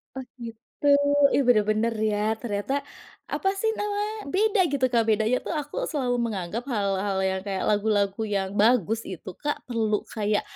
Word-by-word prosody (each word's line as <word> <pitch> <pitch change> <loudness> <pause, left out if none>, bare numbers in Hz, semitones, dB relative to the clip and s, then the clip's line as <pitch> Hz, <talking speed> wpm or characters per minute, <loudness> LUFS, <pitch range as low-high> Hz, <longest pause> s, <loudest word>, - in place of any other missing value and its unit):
Oh 265 -1 -5 0.2
gitu, 230 +5 -10 0.5
ih - - +4
bener-bener 215 0 +3 0.2
ya, 205 -1 -1 0.2
ternyata 205 +2 -2 0.6
apa 385 - +1
sih 445 - +2
namanya, 415 +1 -1 0.2
beda 420 +2 +2
gitu, 275 -2 +2
Kak. 235 -2 +3
Bedanya 220 +3 +2
tuh - - -2
aku, 290 0 -8 0.2
selalu 255 -5 0
menganggap 210 +1 -3
hal-hal 200 -2 0
yang 190 0 -2
kayak 195 -2 -2
lagu-lagu 205 -1 +1
yang 190 -1 0
bagus 225 -1 +3
itu 185 0 -8
Kak, 295 0 0
perlu 220 -3 +1 0.2
kayak 210 -2 +1
220 Hz, 155 wpm, -25 LUFS, 205-260 Hz, 0.6 s, ih